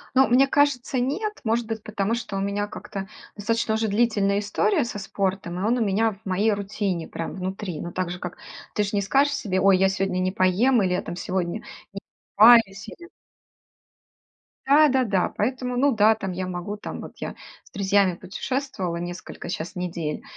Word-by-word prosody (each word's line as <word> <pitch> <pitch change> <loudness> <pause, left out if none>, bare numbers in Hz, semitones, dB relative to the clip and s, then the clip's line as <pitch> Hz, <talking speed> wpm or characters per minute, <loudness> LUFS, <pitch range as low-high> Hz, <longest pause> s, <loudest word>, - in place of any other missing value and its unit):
Ну, 265 +1 +6
мне 260 +3 +5
кажется, 280 -3 +1
нет. 390 - -1
Может 225 +1 0
быть, 220 -1 -4
потому 210 +1 -1
что 230 -4 -4
у 195 - -1
меня 200 +1 -1
как-то 195 -1 -7 0.3
достаточно 225 +1 0
уже 220 0 0
длительная 205 -2 +2
история 285 - +1
со 220 -3 -5
спортом, 190 -2 -2
и - - -3
он 235 +4 +2
у 225 - +2
меня 215 +3 +1
в 200 +2 -18
моей 205 +4 +2
рутине 200 -4 -2
прям 165 - -5
внутри, 185 -2 -4
но 175 - -6
так 185 -2 -2
же, 180 - -5
как 180 -1 -6 0.4
ты 210 - +1
же 205 - -2
не 200 - +2
скажешь 280 +7 +2
себе: 185 -7 -1
"Ой, 195 -1 +5
я 190 0 +4
сегодня 190 -1 -1
не 185 0 0
поем" 205 +6 +3
или 185 -1 +1
"Я 180 - 0
там 175 - -6
сегодня 185 +3 -2 0.3
не 195 - -7 0.4
покупаюсь", 215 -2 +6
или 345 +1 -11 1.6
Да 295 +2 +6
да-да, 235 -9 +1
поэтому, 250 +2 -1
ну 275 +2 +3
да, 215 +1 +5
там, 195 -4 -5
я 185 +1 -3
могу, 185 +3 -4
там, - - -7
вот - - -9
я - - -6 0.3
с - - -21
друзьями 195 -1 +2
путешествовала 190 0 -4
несколько, 175 0 -7
щас, 170 -1 -4
недель. 170 -4 -4
205 Hz, 190 wpm, -24 LUFS, 185-235 Hz, 1.6 s, Ну